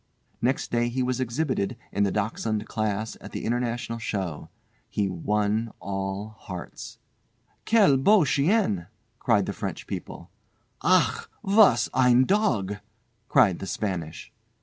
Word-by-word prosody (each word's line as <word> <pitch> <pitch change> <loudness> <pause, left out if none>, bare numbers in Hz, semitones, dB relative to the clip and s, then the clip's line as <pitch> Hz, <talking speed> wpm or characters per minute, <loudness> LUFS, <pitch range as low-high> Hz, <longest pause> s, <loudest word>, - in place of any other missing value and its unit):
Next 130 +3 0
day 120 0 +1
he 130 +2 -1
was 125 0 -1
exhibited 125 -3 -1
in 100 - -1
the 100 - 0
Dachshund 110 +1 -2
class 110 0 -2
at - - -10
the - - -4
International 120 0 -2
show. 95 -9 -4 0.4
He 100 -2 0
won 105 +5 -1
all 95 +1 -4
hearts. 90 -2 -8 0.7
"Quel 205 -12 +5
beau 190 +6 +5
chien!" 140 - +1 0.3
cried - - +2
the - - -3
French - - -5
people. - - -7 0.5
"Ach! - - +2
was 195 - +5
ein 125 0 +5
Dog!" 120 - +1 0.5
cried 95 -8 +4
the 95 - -6
Spanish. 90 -5 -4
115 Hz, 125 wpm, -26 LUFS, 100-130 Hz, 0.7 s, Quel